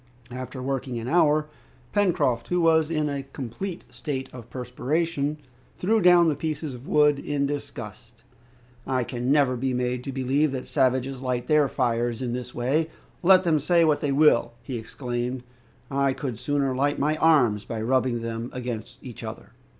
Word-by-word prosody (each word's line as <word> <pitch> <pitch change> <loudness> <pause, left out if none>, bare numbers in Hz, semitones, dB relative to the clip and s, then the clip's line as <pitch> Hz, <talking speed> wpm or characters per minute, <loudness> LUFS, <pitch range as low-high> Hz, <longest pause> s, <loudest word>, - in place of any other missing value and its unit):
After 125 +1 -6
working 135 -2 -2
an 115 +1 -5
hour, 155 0 +3 0.5
Pencroft, 180 - +1
who 180 - +1
was 160 -2 +4
in 155 -2 0
a 140 -1 -2
complete 135 - -6
state 135 -4 -4
of 120 -2 -10
perspiration, 145 +4 -2 0.4
threw 220 +4 +2
down 175 -1 +6
the 155 - +2
pieces 155 -1 -3
of 125 +2 -10
wood 150 -1 +4
in 145 -1 -1
disgust. 120 -5 -7 0.6
"I 130 -2 +1
can 125 +2 -2
never 140 -3 +4
be 130 +1 -1
made 125 0 -1
to 135 - -3
believe 135 +3 +1
that 130 - -5
savages 130 -1 +1
light 125 -2 -2
their 150 -2 +4
fires 120 -3 0
in 125 -2 -2
this 125 0 -5
way, 145 +7 +1 0.3
let 185 +1 +6
them 160 -4 +3
say 170 +3 +3
what 150 -2 +2
they 145 - 0
will," 140 -5 +4
he 120 -1 -4
exclaimed. 120 +2 -4 0.5
"I 140 0 +2
could 130 -5 -5
sooner 140 -2 0
light 145 +2 +1
my 150 +2 +1
arms 125 -11 +4
by 115 - -5
rubbing 120 0 +1
them 115 +1 -4
against 120 -2 -5
each 125 -5 -9
other!" - - -8
135 Hz, 170 wpm, -25 LUFS, 125-150 Hz, 0.6 s, down